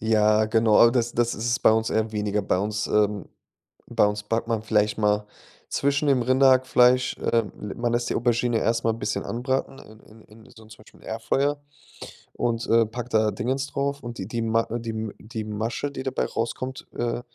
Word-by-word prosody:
Ja, 110 -1 +3
genau, 110 -1 +3
aber 115 - +7
das 120 -2 0
das 120 0 0
ist 115 +2 -4
es 120 0 +1
bei - - +5
uns 110 0 0
eher 110 0 0
weniger. 105 -1 -1
Bei 90 - 0
uns, 105 +2 -2
ähm 105 -3 +1 0.6
bei - - +3
uns 105 0 -3
backt 115 +2 -2
man 110 -2 -1
vielleicht 105 -1 +1
mal 105 0 +1 0.4
zwischen 140 +1 0
dem 130 -3 +3
Rinderhackfleisch, 130 0 +4 0.2
ähm 115 -3 +1 0.2
man 120 0 -1
lässt 120 0 -1
die - - 0
Aubergine 120 0 +1
erst 115 +1 0
mal 115 - +3
'n 115 - -7
bisschen - - -2
anbraten 130 +3 -2
in 110 +1 -15 0.2
in 110 +1 -18
in - - -19
so 110 - -16
'nem 110 - -18
zum 110 - -13
Beispiel - - -20
Airfryer 140 +6 -1 0.7
und, 115 -1 -2
äh, 115 0 +4
packt 120 +2 -7
da 110 -1 +3
Dings 130 +6 -2
drauf. 140 +1 -2
Und 120 -1 -7
die 95 - -5
die 115 +1 -3
Ma 115 0 +2
äh, 120 - -3
die 115 - -6
M 110 -1 -5
die 110 0 -6
Masche, 110 +6 -3
die 130 - -6
dabei 130 - -1
rauskommt, 130 +3 -4
äh, 120 0 -2
115 Hz, 210 wpm, -24 LUFS, 110-125 Hz, 0.7 s, aber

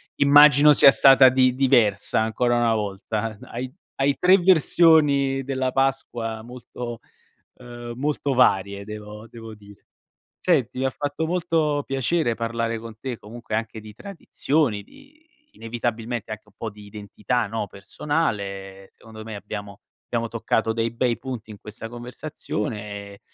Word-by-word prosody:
immagino 145 +1 +7
sia 140 - +7
stata 135 -1 +7
di 130 -1 +3
diversa 120 -7 +2
ancora 120 +2 0
una 120 -1 +2
volta. 105 +1 -3
Hai 130 0 -6 0.3
hai 140 +1 +1
3 185 +1 +6
versioni 155 -6 +4
della 130 -1 -2
Pasqua 120 -4 -2
molto, 120 0 -8 0.6
ehm, 120 -1 -9
molto 145 0 -1
varie 100 -5 +2
devo 105 +1 -9
devo 115 -1 -11
dire. 105 -1 -18 0.6
Senti, 135 -9 +1
mi 130 - -1
ha 135 - +1
fatto 145 +3 -3
molto 160 -4 0
piacere 135 -1 0
parlare 115 0 -2
con 110 -1 -11
te, 125 0 -5
comunque 115 +2 -8
anche 110 0 -3
di 105 -1 -12
tradizioni, 150 - -2
di 285 - -21 0.3
inevitabilmente 115 - -4
anche 110 0 -8
un 105 - -24
po' 115 - -5
di 105 0 -14
identità, 105 +3 -3
no, 110 +1 -4
personale 110 +4 -2 0.4
e - - -31
secondo 110 -1 -12
me 110 -1 -7
abbiamo 100 0 -8 0.3
abbiamo 115 -1 -1
toccato 115 -1 -1
dei 115 0 -1
bei 120 0 -1
punti 125 -4 -7
in 105 - -10
questa 110 0 -9
conversazione 120 0 -5 0.3
e 100 - -16
120 Hz, 145 wpm, -23 LUFS, 110-135 Hz, 0.6 s, immagino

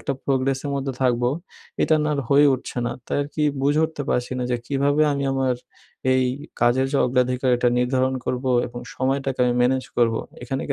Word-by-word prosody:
একটা 140 - -2
প্রোগ্রেসের 135 +1 0
মধ্যে 135 -1 -2
থাকবো, 120 -1 +2 0.5
এটা 160 - +3
না 150 - 0
আর 140 - -1
হয়ে 145 +1 +6
উঠছে 130 -1 -6
না। - - -1
তাই - - -1
আরকি 145 +2 -4 0.2
বুঝে 145 +3 +3
উঠতে 160 -2 -4
পারছি 125 +1 -1
না 125 - -1
যে 120 - +2
কিভাবে 145 +2 +2
আমি 140 0 -2
আমার 135 -1 +1 0.6
এই 130 - +3 0.4
কাজের 125 +2 +3
যে 140 - +2
অগ্রাধিকারটা 125 -1 +2
নির্ধারণ 130 +1 +1
করবো 130 +1 -1 0.2
এবং 120 0 -8
সময়টাকে 135 0 -1
আমি 120 - +1
ম্যানেজ 130 +1 +2
করবো? 115 -2 +2 0.2
এখানে 135 +2 -3
কি - - +1
130 Hz, 185 wpm, -23 LUFS, 125-140 Hz, 0.6 s, হয়ে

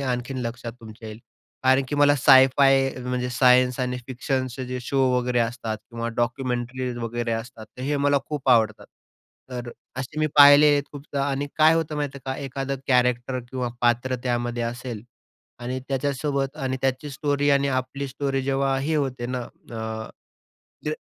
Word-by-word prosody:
आणखीन 130 0 -2
लक्षात 115 0 -6
तुमच्या 110 0 -10
येईल. 110 +1 -9 0.4
कारण 130 +1 +5
की - - -2
मला 145 0 +5
साय-फाय, 135 0 +5
म्हणजे 125 0 -2
सायन्स 125 0 +4
आणि 125 0 -1
फिक्शनचे 130 0 -3
जे 125 0 -4
शो 135 +3 -2 0.2
वगैरे 125 0 +1
असतात 115 -2 -2
किंवा 115 0 -4
डॉक्युमेंटरीज 125 0 -2
वगैरे 120 0 -3
असतात, 115 0 -6
तर 110 +4 -11
हे 145 +2 0
मला 145 0 +3
खूप 145 -3 -4
आवडतात. 110 -3 +3 0.6
तर 125 -1 -5 0.3
असे 135 +3 -6
मी 155 - +3
पाहिले 145 +1 +9
आहेत 145 0 +2
खूपदा 140 -1 -4
आणि 140 +1 -2
काय 155 +1 +6
होतं 160 -2 -1
माहितीये 140 -2 -3
का? 130 0 -2
एखादं 135 +1 -3
कॅरेक्टर 125 0 +2
किंवा 125 -2 -2
पात्र 120 +2 +2
त्यामध्ये 120 -1 -1
असेल 120 -2 -5 0.6
आणि 125 +2 -4
त्याच्यासोबत 140 +1 -1
आणि 130 -3 -2
त्याची 135 +2 -1
स्टोरी 145 +1 0
आणि 140 0 +3
आपली 135 +1 -2
स्टोरी 135 0 -2
जेव्हा 135 0 0
हे 155 +4 -1
होते 130 -4 -2
ना 125 0 -3 0.3
अ, 110 -1 -5 0.8
ते 150 - 0
130 Hz, 160 wpm, -24 LUFS, 120-140 Hz, 0.8 s, पाहिले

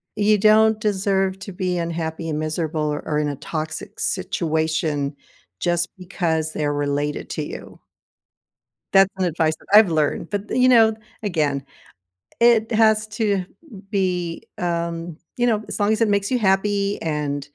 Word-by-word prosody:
You 210 0 +3
don't 215 +1 +5
deserve 195 -2 0
to 195 - -8
be 180 -1 -2
unhappy 165 -1 -3
and 155 0 -2
miserable 155 -1 -2
or - - -4
or 150 -1 0
in 150 - 0
a 145 - -3
toxic 155 -1 -5
situation 160 -5 -1 0.4
just 175 -1 0
because 165 -4 -2
they're 145 -1 -1
related 145 0 -2
to - - -3
you. - - -9 1.2
That's 195 0 +6
some 185 - +1
advice 160 -1 +1
that - - -22
I've 215 -5 +7
learned. 155 +3 0
But 205 0 -3
th - - -1
you 255 - +6
know, 225 -3 +5 0.3
again, 150 -8 0 0.8
it 235 -1 +4
has 220 -1 +4 0.2
to - - +3
m 185 -1 -3 0.4
be, 180 -4 -1
um 170 -1 -1 0.4
you 245 - +2
know, 215 -2 +1
as - - -4
long 205 +1 +2
as 220 - -2
it 220 - +3
makes 200 0 +1
you 250 - +2
happy 200 0 +1
and 150 -3 -2
180 Hz, 160 wpm, -22 LUFS, 155-205 Hz, 1.2 s, I've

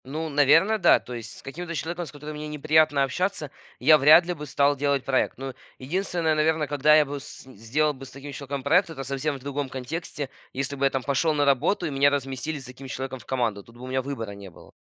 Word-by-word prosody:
Ну, 155 +5 -4
наверное, 155 +9 +4
да. - - +6
То 125 - -10
есть 115 -2 -8
с - - -14
каким-то 170 +5 -6
человеком, 170 +4 -3
с - - -10
которым 150 +1 -8
мне 150 0 -6
неприятно 150 -1 +3
общаться, 150 +1 -2 0.3
я 155 +4 +7
вряд 155 +5 +7
ли 180 - -2
бы 150 -3 -8
стал 140 +1 +2
делать 140 -1 0
проект. 130 -1 0
Ну, 135 0 -6 0.2
единственное, 170 +2 -1
наверно, 155 0 +1
когда 145 +2 +4
я 155 -1 +5
бы 145 0 -5
с 140 - -11
сделал 130 +5 -1
с 135 - -9
таким 140 +2 -9
человеком 140 -1 -5
проект, 180 +5 +3
это 140 -4 -6
совсем 140 +2 -2
в - - -8
другом 140 +1 -4
контексте. 145 +2 -5 0.2
Если 135 +1 -3
бы 140 0 0
я - - +5
там 135 -1 -3
пошел 140 +5 +1
на 145 -1 +2
работу 140 +7 +2
и 155 - -2
меня 140 +1 +4
разместили 140 +2 -3
с 130 - -11
таким 125 +2 -10
человеком 130 0 -5
в - - -16
команду. 115 -6 -1
Тут 115 +3 -18
бы 125 - -12
у - - -7
меня 130 +1 -1
выбора 130 -6 -5
не 100 -1 -10
было. 85 - -17
140 Hz, 240 wpm, -25 LUFS, 130-155 Hz, 0.3 s, я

